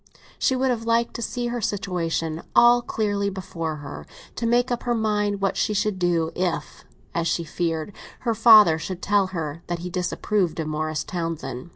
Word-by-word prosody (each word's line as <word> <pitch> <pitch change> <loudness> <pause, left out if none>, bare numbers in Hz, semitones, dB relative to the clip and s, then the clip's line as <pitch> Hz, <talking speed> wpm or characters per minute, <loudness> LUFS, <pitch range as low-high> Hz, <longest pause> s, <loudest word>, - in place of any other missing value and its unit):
She 260 - +2
would 260 0 +1
have 230 -2 -2
liked 230 +1 +1
to - - -5
see 240 +1 -2
her 240 0 -3
situation 170 -5 -2
all 240 0 +7
clearly 205 -3 -1
before 165 -4 -4
her, - - -8 0.3
to 230 - -1
make 245 +2 +2
up 240 - -1
her 240 -1 0
mind 210 -2 0
what 195 - +1
she 210 - 0
should 205 -1 0
do 170 -2 +1
if, 170 -4 -3 0.3
as 170 0 0
she 170 - 0
feared, 165 +2 -3 0.3
her 235 -2 0
father 215 -7 +7
should 185 +2 -6
tell 200 -1 +3
her 165 -4 -5
that 175 - -2
he 180 - -5
disapproved 180 0 -1
of 160 - -1
Morris 155 0 -2
Townsend. 165 -5 -4
190 Hz, 185 wpm, -24 LUFS, 165-220 Hz, 0.3 s, all